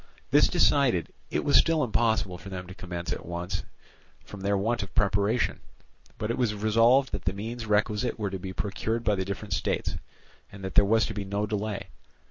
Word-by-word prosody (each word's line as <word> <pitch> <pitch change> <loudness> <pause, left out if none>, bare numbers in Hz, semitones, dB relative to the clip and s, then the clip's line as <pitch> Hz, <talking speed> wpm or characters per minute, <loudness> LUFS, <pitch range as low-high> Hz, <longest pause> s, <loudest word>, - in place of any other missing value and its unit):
This - - +6
decided, 120 - +3 0.2
it - - -1
was 145 - +6
still 165 -2 +3
impossible 110 -6 +1
for 95 - -9
them 90 -1 -6
to 95 - -10
commence 90 -2 -4
at - - -7
once, 85 +1 -3 0.6
from 100 - -10
their 100 +1 +1
want 115 +4 0
of 100 -2 -8
preparation; 105 +3 +1 0.6
but 105 +2 -2
it 120 - -3
was 115 -4 +1
resolved 115 +6 +4
that 100 - -5
the 95 - +1
means 110 +3 -5
requisite 105 +2 +1
were 105 -3 -2
to 95 - -4
be 95 +1 -6
procured 110 +4 -2
by 105 - +2
the 95 -2 -1
different 100 0 -4
states, - - -1 0.5
and 100 -1 -11
that 95 - -4
there - - +6
was 110 +1 +3
to 110 - -4
be 100 -1 -4
no 100 +2 -1
delay. 105 -1 -3
105 Hz, 200 wpm, -27 LUFS, 95-115 Hz, 0.6 s, This